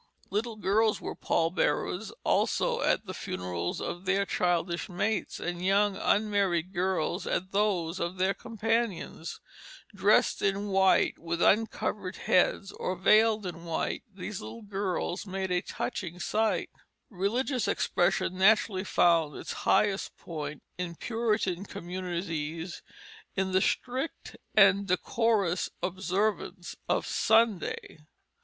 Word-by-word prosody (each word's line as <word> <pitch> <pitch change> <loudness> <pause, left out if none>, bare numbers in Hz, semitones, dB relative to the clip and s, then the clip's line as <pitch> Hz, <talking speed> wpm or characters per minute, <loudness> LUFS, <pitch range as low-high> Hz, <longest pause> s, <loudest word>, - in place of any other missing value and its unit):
Little 220 +3 -1
girls 215 +1 +2
were - - -5
pall 165 0 0
bearers 180 +4 0
also - - +1
at - - +1
the - - -6
funerals 90 -1 -3
of 175 +2 -5
their 195 +2 +2
childish 175 -1 0
mates, 200 +3 -1
and 175 0 -4
young 200 +1 +3
unmarried 200 -5 +1
girls 180 0 -1
at 185 +1 -1
those 190 -4 0
of 175 +2 -3
their 190 +2 +2
companions. 225 -7 -2 0.5
Dressed - - +3
in 200 +1 0
white 190 -1 +3
with 170 0 -3
uncovered 205 -2 +1
heads, 195 +2 +2
or 185 - -3
veiled 215 +3 +4
in 170 -2 -6
white, 165 -2 -2
these 195 0 -6
little 230 - -8
girls 195 -2 -2
made 190 0 -3
a 180 0 +2
touching 180 -1 -4
sight. 210 +1 0 0.4
Religious 235 +7 0
expression 180 +1 +1
naturally 195 -1 +4
found 165 -6 +3
its - - -5 0.2
highest 205 -2 +2
point 150 -3 -6 0.2
in 175 -2 -3
Puritan 210 -4 -1
communities 175 -3 -4 0.5
in 190 -1 0
the 185 0 +3
strict 260 +9 -2 0.2
and 200 -1 +6
decorous 195 -1 +1
observance 190 0 -1
of - - +1
Sunday. 220 -8 +1
190 Hz, 120 wpm, -29 LUFS, 175-210 Hz, 0.5 s, and